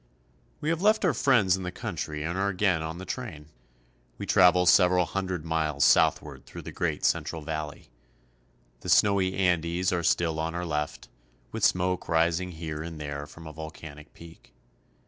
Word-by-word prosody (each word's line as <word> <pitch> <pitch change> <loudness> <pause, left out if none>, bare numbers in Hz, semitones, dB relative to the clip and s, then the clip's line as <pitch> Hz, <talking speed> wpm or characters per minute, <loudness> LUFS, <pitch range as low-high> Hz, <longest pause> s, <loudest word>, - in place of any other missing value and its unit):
WE 150 - -1
have 165 +1 0
left 215 +2 +3
pur 180 - +3
friends 110 -10 +3
in 95 - -6
the 90 0 -4
country 85 -8 -5
and 85 +3 -3
are 100 +1 0
again 95 -3 +1
on 80 +1 -5
the 95 - -8
train. 95 - -6 0.7
We - - -5
travel 90 -1 +5
several 90 0 +5
hundred 95 -4 -3
miles 80 -3 +1
south - - +4
ward - - -12
through - - -9
the - - -7
great - - -2
central 80 -2 0
valley. 75 -1 -6 0.9
The - - -7
snowy 95 -2 +3
Andes 90 -1 +1
are 85 - 0
still 80 -1 +1
on 80 +1 -2
our 90 0 -3
left, 75 -2 -3 0.4
with 110 -2 -5
smoke 90 -1 +1
rising 85 +2 +1
here 80 -2 -5
and 80 -1 -7
there 70 -1 -5
from 80 +1 -13
a 80 - -8
volcanic 80 -1 -10
peak. 80 -7 -15
85 Hz, 175 wpm, -27 LUFS, 80-95 Hz, 0.9 s, travel